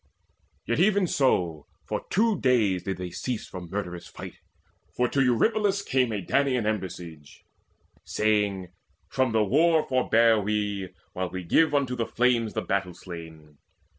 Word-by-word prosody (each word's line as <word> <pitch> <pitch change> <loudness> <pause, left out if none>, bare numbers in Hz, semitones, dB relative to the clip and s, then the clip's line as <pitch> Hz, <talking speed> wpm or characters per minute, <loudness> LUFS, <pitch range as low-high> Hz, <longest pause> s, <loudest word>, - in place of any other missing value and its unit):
Yet 120 - 0
even 200 +1 +4
so 90 - 0 0.2
for - - -4
two 215 -1 +2
days 110 -8 +2
did 95 -2 -2
they 90 -1 -6
cease 115 +6 -4
From 90 -2 -8
murderous 90 -3 -5
fight; - - -10 0.6
for 125 - +3
to 135 - 0
Eurypylus 200 - +2
came 130 -7 +1
A 105 -3 -3
Danaan 130 -5 +1
embassage, 90 -7 -5 0.6
saying, 105 -4 0 0.4
"From 130 -3 +1
the 110 -1 +3
war 155 - +3
Forbear 115 -4 +3
we, 105 -2 -2 0.2
while 90 0 -3
we 95 +1 -6
give 145 - +3
unto 135 -3 +1
the 115 -2 -2
flames 120 -2 +1
The - - -2
battle 95 -3 -2
slain." 80 -4 -11
110 Hz, 145 wpm, -26 LUFS, 95-130 Hz, 0.6 s, even